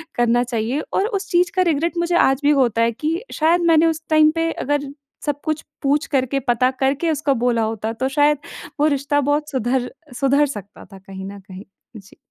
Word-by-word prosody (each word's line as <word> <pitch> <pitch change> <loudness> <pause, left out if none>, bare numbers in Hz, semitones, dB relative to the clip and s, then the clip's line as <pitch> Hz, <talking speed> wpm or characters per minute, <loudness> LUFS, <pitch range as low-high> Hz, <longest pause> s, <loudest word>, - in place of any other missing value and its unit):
करना 240 0 +2
चाहिए 240 +3 -2
और 395 - +1
उस 395 -4 -4
चीज़ 350 0 +2
का 370 - +3
रिग्रेट 335 +4 -1
मुझे 345 0 0
आज 270 -2 +3
भी 290 - +4
होता 230 -2 +1
है 230 0 +3
कि 310 +8 -2
शायद 330 +3 +2
मैंने 320 0 +5
उस 320 0 -1
टाइम 310 0 +5
पे 330 0 0
अगर 290 -2 -2 0.4
सब 290 -1 -2
कुछ 310 -1 -2 0.2
पूछ 285 +2 +1
करके, 270 -1 0
पता 250 0 +1
करके 270 +5 0
उसको 285 -2 0
बोला 235 -2 +2
होता, 220 0 -3
तो 260 +3 -2
शायद 295 +1 +3 0.4
वो 300 - +4
रिश्ता 285 +1 0
बहुत 295 +1 -1
सुधर 250 -1 -1 0.3
सुधर 280 +2 +3
सकता 210 -7 -9
था 195 -2 -14
कहीं 190 0 -9
न 200 - -10
कहीं। 190 0 -11 0.3
जी। 200 -1 -16
275 Hz, 200 wpm, -20 LUFS, 240-310 Hz, 0.4 s, मैंने